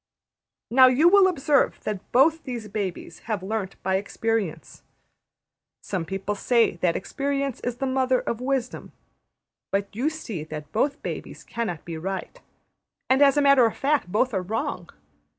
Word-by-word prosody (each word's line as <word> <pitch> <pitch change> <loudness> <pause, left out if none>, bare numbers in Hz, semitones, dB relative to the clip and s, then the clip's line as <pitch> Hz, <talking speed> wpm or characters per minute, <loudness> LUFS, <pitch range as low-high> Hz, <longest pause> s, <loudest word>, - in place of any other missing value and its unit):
Now 260 +1 +8
you 260 +6 +4
will 385 +1 +7
observe 290 -5 +2
that 210 -3 -5
both 315 +6 +4
these 240 -4 -5
babies 195 -5 -5
have 210 -4 -1
learnt 195 -1 -3
by 190 0 +1
experience. 210 -2 -3 1.0
Some 185 -4 -3
people 195 +4 -3
say 230 -2 +2
that 170 -1 +1
experience 275 -2 -2
is 245 -1 -3
the 270 - -2
mother 260 -1 +1
of 235 - -4
Wisdom; 255 -1 -3 0.8
but 200 0 -2
you 260 +7 +1
see 230 - -6
that 150 -1 -8
both 280 +6 0
babies - - -6
cannot 220 -9 -4
be 165 -2 -6
right; 195 - -5 0.7
and, 265 +2 +4
as 280 0 +6
a 290 - +4
matter 275 -4 +6
of 225 - -5
fact, 280 -10 0
both 240 +5 +1
are 190 - 0
wrong. 215 +5 -3
230 Hz, 155 wpm, -25 LUFS, 195-275 Hz, 1.0 s, Now